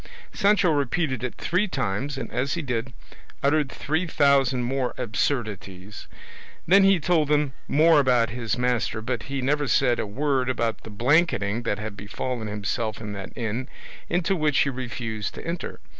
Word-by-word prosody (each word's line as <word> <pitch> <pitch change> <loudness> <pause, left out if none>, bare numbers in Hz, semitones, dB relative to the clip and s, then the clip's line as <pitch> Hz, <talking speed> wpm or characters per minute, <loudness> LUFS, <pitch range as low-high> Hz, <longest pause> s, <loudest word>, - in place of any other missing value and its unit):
Sancho 200 -4 +3
repeated 140 -2 0
it 125 - -3
three 185 +5 0
times, 135 - -2
and - - -5
as 130 +3 -1
he 170 - -3
did, 125 -1 -2 0.5
uttered 145 -1 +2
three 160 +5 -1
thousand 135 -5 +3
more 130 0 -1
absurdities; 105 -5 -3 0.6
then 195 +4 +6
he 195 -2 +5
told 160 -2 +2
them 145 -2 +1
more 160 +1 +5
about 125 -4 +3
his 115 -1 -2
master 125 -2 0
but 120 +1 -3
he 135 -1 -2
never 145 +2 +1
said 125 -2 +3
a - - -2
word 130 +3 0
about 115 -3 -1
the - - -10
blanketing 120 - +2
that 110 -4 -1
had 105 -1 -6
befallen 110 +3 -4
himself 105 +1 -3
in 105 -2 -6
that 100 -1 -7
inn, 120 +2 -3 0.4
into 175 +2 +1
which 150 -4 +1
he 140 - +2
refused 115 -4 -4
to - - -8
enter. 170 +1 -4
130 Hz, 165 wpm, -25 LUFS, 110-150 Hz, 0.6 s, then